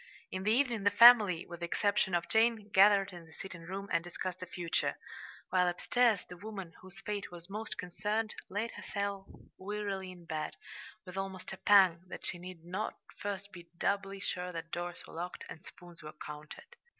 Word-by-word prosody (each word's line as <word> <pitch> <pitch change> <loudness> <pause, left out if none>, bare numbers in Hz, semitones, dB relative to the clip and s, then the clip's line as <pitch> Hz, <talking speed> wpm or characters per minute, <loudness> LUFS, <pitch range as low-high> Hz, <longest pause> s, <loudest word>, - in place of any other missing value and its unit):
In 185 - -3
the 210 +3 +2
evening 240 -2 +2
the 205 - +6
family, 215 -8 +8
with 170 -1 -9
the 170 - -3
exception 200 0 +2
of 170 0 0
Jane, 220 -1 +3
gathered 200 0 +6
in 175 -1 -9
the 160 - -16
sitting 180 0 -8
room 190 +4 -5
and 170 -1 +2
discussed 175 +1 -5
the 185 - -6
future, 170 -1 -1 0.5
while 180 -1 +4
upstairs 220 +4 +2
the 180 - -10
woman 195 -4 -7
whose 190 +1 -11
fate 205 0 -3
was 175 +1 -11
most 215 +2 -4
concerned 210 +4 -2 0.2
laid 210 +4 -2
herself 200 -1 -3 0.3
wearily 200 -1 -3
in 175 -2 -13
bed 155 -2 -3 0.5
with 180 0 -8
almost 190 -1 -4
a - - -7
pang 190 -5 +6
that - - -7
she 175 - -2
need 175 -2 -9
not 190 +5 -2
now - - -33 0.2
first 200 0 -4
be 175 -2 -12
doubly 195 0 0
sure 180 -2 -3
that 165 -1 -6
doors 175 0 -3
were - - -13
locked 175 +2 -5
and 160 - -9
spoons 175 -2 -13
were 155 0 -8
counted. 150 - -10
190 Hz, 190 wpm, -33 LUFS, 175-205 Hz, 0.5 s, family